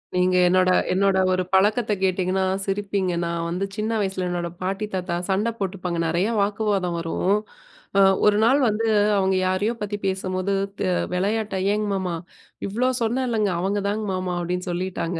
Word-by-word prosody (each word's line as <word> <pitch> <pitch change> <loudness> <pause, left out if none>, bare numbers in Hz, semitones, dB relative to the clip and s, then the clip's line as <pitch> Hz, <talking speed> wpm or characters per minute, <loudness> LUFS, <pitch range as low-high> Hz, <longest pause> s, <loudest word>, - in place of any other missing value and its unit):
நீங்க 180 0 +2
என்னோட, 185 0 +4 0.2
என்னோட 195 0 +2 0.2
ஒரு 185 0 +1
பழக்கத்தை 210 +3 +3
கேட்டீங்கன்னா 185 0 +1 0.2
சிரிப்பீங்க. 195 -2 -1
நான் 170 0 -2
வந்து 180 +3 -1
சின்ன 215 +1 -1
வயசுல 190 -2 -2
"என்னோட 175 -1 -2
பாட்டி, 195 +3 -2
தாத்தா 180 -2 -2
சண்டை 205 +4 +1
போட்டுப்பாங்க. 185 -3 -3
நெறைய 175 +6 +1
வாக்குவாதம் 200 -4 0
வரும்." 180 +4 +1 0.6
அ - - +7 0.2
ஒரு 210 0 +5
நாள் 265 +5 +4
வந்து 220 +1 0 0.3
அவுங்க 190 -1 +2
யாரையோ 195 +5 0
பத்தி 205 0 -3
பேசும்போது, 190 0 -1 0.3
தி - - 0 0.3
விளையாட்டா 205 +2 -1 0.2
"ஏங்க 210 0 -1
மாமா! 185 -2 -2 0.5
இவ்வளோ 230 +6 0
சொன்னேன் 240 +3 0
இல்லைங்க, 215 -4 +1
அவங்க 195 +3 0
தாங்க 210 +2 -1
மாமா" 185 -1 -2
அப்படீன்னு 180 +2 -3
சொல்லிட்டாங்க. 175 -1 -3
190 Hz, 155 wpm, -23 LUFS, 180-210 Hz, 0.6 s, அ